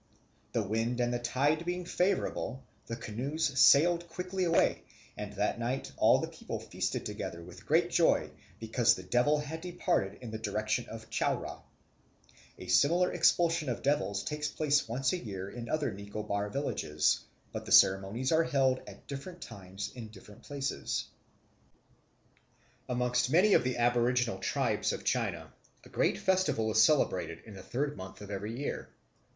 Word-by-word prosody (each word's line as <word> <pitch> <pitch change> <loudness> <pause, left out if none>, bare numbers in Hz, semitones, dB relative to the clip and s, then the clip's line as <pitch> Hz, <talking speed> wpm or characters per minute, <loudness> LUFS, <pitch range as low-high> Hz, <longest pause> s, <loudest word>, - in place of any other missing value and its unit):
The 115 - +1
wind 115 +4 -1
and 120 0 +1
the 120 - -1
tide 140 +7 +1
being 180 +1 -3
favourable, 175 - -1 0.2
the 115 - -3
canoes 135 +6 -2
sailed 170 +5 +6
quickly 185 +2 -2
away; 165 -1 +2 0.3
and 105 -1 -6
that 105 +3 -1
night 125 +3 -2
all - - +5
the - - -2
people - - -6
feasted - - -3
together 85 0 -5
with 90 0 -13
great - - +3
joy, - - +3 0.3
because 115 +1 +3
the 95 - -8
devil 125 +11 +2
had 150 +2 -5
departed 175 - -1
in 120 -3 -8
the 110 - -5
direction 110 +2 -1
of 110 0 -9
Chowra. - - -1 1.0
A - - -9
similar 165 - +3
expulsion 165 -4 +3
of 120 - -3
devils 100 -8 0
takes 150 0 -2
place 150 -3 +1
once 130 +5 0
a 180 - -1
year 95 - -6
in 120 -1 -7
other 155 -2 0
Nicobar 100 +1 -4
villages; 90 - 0 0.3
but - - -6
the - - -6
ceremonies 95 +7 +4
are 165 0 +4
held 130 -3 +2
at - - -12
different 160 +5 -7
times 95 0 -7
in 120 -3 -8
different 105 -1 -14
places. 140 -1 -3 1.8
Amongst 125 0 +1
many 185 +8 +5
of - - +5
the 125 0 -1
aboriginal 120 -2 +2
tribes 115 0 0
of - - -6
China, - - -1 0.3
a - - -15
great - - +1
festival 185 -13 +1
is 110 +1 +5
celebrated 100 - +2
in 110 - -11
the 95 - -9
third 140 +9 -2
month 95 +1 -9
of 105 0 -8
every 105 +4 -4
year. 145 - -4
125 Hz, 160 wpm, -31 LUFS, 105-150 Hz, 1.8 s, sailed